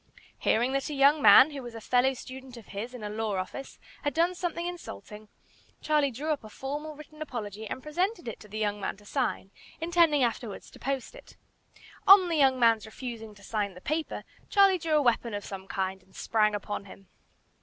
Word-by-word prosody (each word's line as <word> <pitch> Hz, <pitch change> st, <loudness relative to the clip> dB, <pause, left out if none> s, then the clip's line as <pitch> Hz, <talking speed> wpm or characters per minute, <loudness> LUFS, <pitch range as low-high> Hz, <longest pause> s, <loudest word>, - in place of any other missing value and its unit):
Hearing 240 Hz, +4 st, +2 dB
that 275 Hz, +1 st, -1 dB
a 295 Hz, -, -4 dB
young 280 Hz, +2 st, +5 dB
man, 255 Hz, +7 st, +9 dB
who 280 Hz, -2 st, -6 dB
was 240 Hz, -2 st, -9 dB
a -, -, -6 dB
fellow 250 Hz, +4 st, +2 dB
student 260 Hz, 0 st, -10 dB
of 225 Hz, -, -13 dB
his 230 Hz, +5 st, -6 dB
in 235 Hz, -, -8 dB
a 210 Hz, -, -3 dB
law 215 Hz, -1 st, -2 dB
office, 190 Hz, +9 st, -5 dB, 0.2 s
had 290 Hz, -2 st, -2 dB
done 340 Hz, +2 st, +3 dB
something 345 Hz, -1 st, -3 dB
insulting, 215 Hz, -, -8 dB, 0.5 s
Charlie 300 Hz, -2 st, +2 dB
drew 285 Hz, +6 st, -3 dB
up 290 Hz, -5 st, -2 dB
a 215 Hz, -, -10 dB
formal 295 Hz, +6 st, -5 dB
written 305 Hz, +1 st, -13 dB
apology 220 Hz, -7 st, -5 dB
and 260 Hz, -, -6 dB
presented 355 Hz, -, -1 dB
it 230 Hz, -, -5 dB
to 210 Hz, -, -13 dB
the 210 Hz, +1 st, -7 dB
young 210 Hz, -1 st, -1 dB
man 195 Hz, -, -3 dB
to 205 Hz, -, -18 dB
sign, 225 Hz, -5 st, -2 dB, 0.3 s
intending 330 Hz, -4 st, +3 dB
afterwards 230 Hz, -3 st, -3 dB
to -, -, -15 dB
post 270 Hz, -, -3 dB
it. -, -, -15 dB, 0.7 s
On 385 Hz, -2 st, +9 dB
the 335 Hz, -, 0 dB
young 265 Hz, -3 st, +4 dB
man's 225 Hz, -2 st, +4 dB
refusing 225 Hz, -2 st, -7 dB
to 205 Hz, -, -17 dB
sign 205 Hz, -3 st, -2 dB
the -, -, -10 dB
paper, 310 Hz, -, -3 dB, 0.3 s
Charlie 390 Hz, -2 st, +5 dB
drew 320 Hz, -1 st, -1 dB
a 300 Hz, -, +5 dB
weapon 235 Hz, -3 st, +1 dB
of 205 Hz, -, -5 dB
some 195 Hz, -1 st, -7 dB
kind 190 Hz, 0 st, -2 dB
and 190 Hz, +1 st, -25 dB
sprang 215 Hz, -2 st, +2 dB
upon 205 Hz, -1 st, -4 dB
him. 195 Hz, 0 st, -14 dB
250 Hz, 210 wpm, -28 LUFS, 210-300 Hz, 0.7 s, man